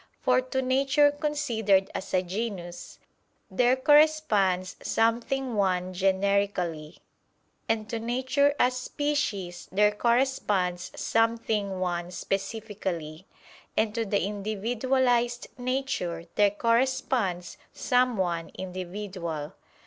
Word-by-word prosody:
For 255 Hz, 0 st, +3 dB
to 260 Hz, +1 st, -2 dB
nature 275 Hz, +3 st, +3 dB
considered 240 Hz, -10 st, +1 dB
as 190 Hz, -, -5 dB
a 185 Hz, 0 st, +2 dB
genus, 185 Hz, -2 st, -5 dB, 0.5 s
there 245 Hz, +6 st, +3 dB
corresponds 260 Hz, -11 st, +3 dB
something 235 Hz, +3 st, 0 dB
one 185 Hz, -3 st, 0 dB
generically; 190 Hz, -4 st, 0 dB, 0.7 s
and 220 Hz, -1 st, 0 dB
to 230 Hz, 0 st, -3 dB
nature 260 Hz, +5 st, +1 dB
as 250 Hz, -2 st, +3 dB
species 250 Hz, -, -2 dB
there 210 Hz, +2 st, +4 dB
corresponds 210 Hz, -6 st, 0 dB
something 225 Hz, -4 st, 0 dB
one 175 Hz, -1 st, -2 dB
specifically; 195 Hz, -4 st, -4 dB, 0.5 s
and 220 Hz, -1 st, +2 dB
to 230 Hz, -, -1 dB
the 200 Hz, -1 st, 0 dB
individualized 240 Hz, +4 st, 0 dB
nature 245 Hz, -10 st, -2 dB
there 205 Hz, -1 st, +4 dB
corresponds 230 Hz, -4 st, 0 dB
some 250 Hz, -2 st, +1 dB
one 170 Hz, -3 st, -1 dB
individual. 180 Hz, -4 st, -5 dB
210 Hz, 95 wpm, -27 LUFS, 185-255 Hz, 0.7 s, there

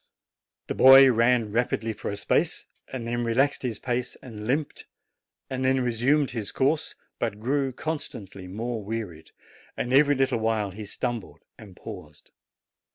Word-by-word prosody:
The -, -, -3 dB
boy 135 Hz, 0 st, +9 dB
ran 115 Hz, -2 st, +2 dB
rapidly 115 Hz, -1 st, 0 dB
for -, -, -6 dB
a 100 Hz, -, -3 dB
space, 100 Hz, -, 0 dB, 0.3 s
then 120 Hz, -1 st, -3 dB
relaxed 130 Hz, +5 st, +1 dB
his 120 Hz, -4 st, -3 dB
pace 125 Hz, 0 st, -2 dB
and 110 Hz, -4 st, -9 dB
limped, 145 Hz, +4 st, -2 dB, 0.6 s
then 130 Hz, 0 st, +1 dB
resumed 130 Hz, +4 st, +1 dB
his 110 Hz, -5 st, -4 dB
course, 140 Hz, +3 st, 0 dB, 0.2 s
but 105 Hz, -, -2 dB
grew! 135 Hz, +3 st, 0 dB
constantly 120 Hz, -, -6 dB
more 110 Hz, +3 st, -4 dB
wearied, 100 Hz, -7 st, -6 dB, 0.5 s
and 125 Hz, -, -2 dB
every 145 Hz, +1 st, +5 dB
little 130 Hz, -3 st, +1 dB
while 110 Hz, -3 st, 0 dB
he 105 Hz, +2 st, -8 dB
stumbled 115 Hz, 0 st, -5 dB
and 100 Hz, -4 st, -13 dB
paused. -, -, -11 dB
120 Hz, 140 wpm, -26 LUFS, 110-130 Hz, 0.6 s, boy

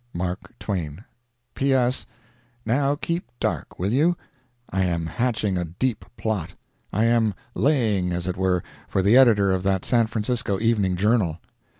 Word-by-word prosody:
MARK 90 Hz, +1 st, -4 dB
TWAIN 90 Hz, -, -4 dB, 0.5 s
P.S.—Now 120 Hz, 0 st, -1 dB
keep 170 Hz, +3 st, -3 dB
dark, -, -, -2 dB
will 95 Hz, +3 st, -1 dB
you? 165 Hz, +6 st, +3 dB, 0.5 s
I 95 Hz, 0 st, +1 dB
am 85 Hz, -2 st, 0 dB
hatching 105 Hz, 0 st, 0 dB
a 90 Hz, -, -1 dB
deep 105 Hz, +8 st, -2 dB
plot. 105 Hz, -7 st, -2 dB, 0.4 s
I 105 Hz, -, +1 dB
am 115 Hz, -3 st, +2 dB, 0.2 s
"laying," 110 Hz, -11 st, +2 dB
as 85 Hz, -1 st, -2 dB
it 90 Hz, -1 st, -2 dB
were, 90 Hz, -2 st, +1 dB, 0.2 s
for 95 Hz, -, 0 dB
the 105 Hz, +5 st, +5 dB
editor 110 Hz, -7 st, +6 dB
of 95 Hz, -1 st, +1 dB
that 95 Hz, -1 st, 0 dB
San 115 Hz, -2 st, +3 dB
Francisco 110 Hz, -2 st, -1 dB
Evening 105 Hz, -5 st, +2 dB
Journal. 100 Hz, -4 st, +2 dB
105 Hz, 140 wpm, -24 LUFS, 90-120 Hz, 0.5 s, editor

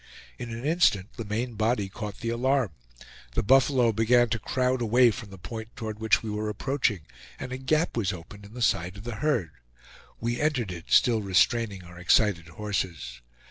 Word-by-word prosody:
In 120 Hz, -, -5 dB
an 115 Hz, +3 st, -6 dB
instant 145 Hz, -, +2 dB
the 115 Hz, -, -6 dB
main 115 Hz, +4 st, -2 dB
body 110 Hz, -1 st, 0 dB
caught 105 Hz, +1 st, -7 dB
the 115 Hz, -, -2 dB
alarm. 125 Hz, -2 st, +1 dB, 0.6 s
The 120 Hz, -, +1 dB
buffalo 130 Hz, 0 st, +4 dB
began 115 Hz, +2 st, +3 dB
to 115 Hz, -, -1 dB
crowd 130 Hz, +2 st, 0 dB
away 120 Hz, +1 st, +5 dB
from 105 Hz, 0 st, -8 dB
the 95 Hz, -, -11 dB
point 110 Hz, +6 st, -7 dB
toward 110 Hz, -2 st, -6 dB
which 110 Hz, 0 st, +2 dB
we 110 Hz, -, -4 dB
were 105 Hz, +1 st, -2 dB
approaching, 110 Hz, -, -1 dB, 0.4 s
and 125 Hz, -, -6 dB
a 130 Hz, -, -4 dB
gap 155 Hz, +5 st, +1 dB
was 105 Hz, -5 st, 0 dB
opened 95 Hz, +3 st, -10 dB
in 100 Hz, +3 st, -13 dB
the 125 Hz, -, -2 dB
side 90 Hz, -2 st, 0 dB
of 100 Hz, -, -9 dB
the 120 Hz, -1 st, -5 dB
herd. 125 Hz, -, 0 dB, 0.7 s
We 120 Hz, +3 st, -2 dB
entered 130 Hz, -10 st, 0 dB
it, 85 Hz, -2 st, -8 dB
still 115 Hz, -3 st, +4 dB
restraining 100 Hz, +1 st, +1 dB
our 90 Hz, 0 st, -12 dB
excited 90 Hz, -1 st, +3 dB
horses. 85 Hz, -9 st, -4 dB
110 Hz, 185 wpm, -27 LUFS, 100-125 Hz, 0.7 s, away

